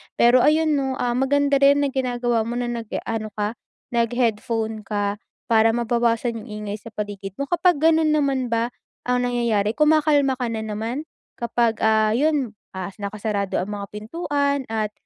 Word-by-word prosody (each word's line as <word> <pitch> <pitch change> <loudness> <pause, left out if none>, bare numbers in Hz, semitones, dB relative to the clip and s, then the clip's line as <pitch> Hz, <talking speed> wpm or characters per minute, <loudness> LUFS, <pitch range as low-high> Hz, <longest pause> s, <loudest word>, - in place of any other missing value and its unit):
Pero, 240 +2 +5
ayon 310 +4 +3
'no, 265 -1 -1
ah, 245 -1 -1
maganda 280 +1 +2
rin 280 +1 +5
na 280 - 0
ginagawa 245 -3 0
mo 240 - -3
na 245 0 -2
nag-aano 225 -1 -4
ka 210 +2 -2 0.3
naghe-headphone 230 -2 0
ka 205 -1 -1 0.3
para 225 0 +5
mabawasan 235 0 0
yung - - -13 0.2
ingay 205 0 -3
sa - - -13
paligid 200 -2 -5
mo. - - 0
Kapag 350 -2 +3
gano'n 320 -1 +4
naman 275 -4 +1
ba 230 +1 0 0.4
ang 250 0 +1
nangyayari 230 -4 +1
kumakalma 300 -3 +3
ka 250 - -1
na 225 -1 -3
naman 220 +6 -3 0.3
kapag, 235 -1 0
ah, 220 -1 +4
'yon, 280 -4 +1 0.2
ah, 190 0 -5
nakasarado 200 -1 -2
ang 180 - -3
mga 200 -1 -6
pintuan 280 +5 -1
at 215 -1 -1
235 Hz, 160 wpm, -23 LUFS, 220-275 Hz, 0.4 s, Pero